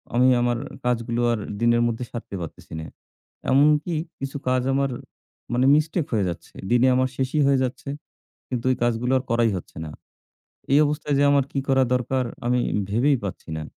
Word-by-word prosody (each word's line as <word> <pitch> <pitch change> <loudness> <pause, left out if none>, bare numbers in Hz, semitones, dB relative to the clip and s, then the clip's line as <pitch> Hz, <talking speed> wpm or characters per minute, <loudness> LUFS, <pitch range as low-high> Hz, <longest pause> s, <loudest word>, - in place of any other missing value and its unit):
আমি 125 +1 +5
আমার 120 -1 +1 0.3
কাজগুলো 120 0 0
আর 115 - -2 0.2
দিনের 120 0 +4
মধ্যে 115 +1 -2
সারতে 115 -4 -6
পারতেছি 80 -1 -9
না। 80 - -6 0.7
এমনকি 150 +4 +4 0.2
কিছু 135 +1 -4
কাজ 130 0 +2
আমার 140 0 +1 0.6
মানে 125 +2 +2
mistake 155 +1 0
হয়ে 105 -4 +2
যাচ্ছে। 85 - -8 0.2
দিনে 120 +2 +5
আমার 130 0 +2
শেষই 135 +3 0
হয়ে 140 -1 +4
যাচ্ছে। 130 +2 -4 0.6
কিন্তু 125 -1 -3
ঐ - - +1
কাজগুলো 120 +1 +1
আর - - -5
করাই 115 -1 +3
হচ্ছে 90 - -9
না। 80 - -7 0.8
এই 140 - +7
অবস্থায় 150 0 -1
যে - - +4
আমার 140 -2 +4
কি - - -2
করা 135 -1 +4
দরকার 125 +1 0 0.2
আমি 125 +1 +2 0.3
ভেবেই 135 +6 +3
পাচ্ছি 95 - -6
না। - - -5
125 Hz, 175 wpm, -24 LUFS, 120-140 Hz, 0.8 s, এই